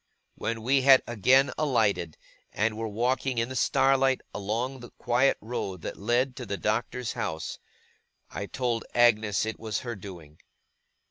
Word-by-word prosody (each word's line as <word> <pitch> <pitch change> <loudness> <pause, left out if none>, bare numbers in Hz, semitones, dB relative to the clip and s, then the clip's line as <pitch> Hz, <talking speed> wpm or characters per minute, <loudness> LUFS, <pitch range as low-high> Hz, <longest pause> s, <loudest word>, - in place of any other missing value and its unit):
When 115 -1 -4
we 135 +3 +3
had 135 0 +7
again 125 +5 +3
alighted, 105 - +1 0.3
and 110 +1 0
were 115 +1 -3
walking 125 +4 -1
in 115 +1 0
the 130 - -6
starlight 135 +2 +3
along 115 +6 -3
the 120 -1 -11
quiet 125 +3 +1
road 100 -6 -5
that - - -5
led 120 +5 0
to 125 -3 -6
the 100 - -3
Doctor's 115 +3 -2
house, 80 0 -4 0.7
I 100 - -5
told 120 -1 -2
Agnes 110 -4 +3
it 110 - -5
was 110 -2 -3
her 120 -2 -5
doing. 85 -6 -11
115 Hz, 150 wpm, -27 LUFS, 105-130 Hz, 0.7 s, had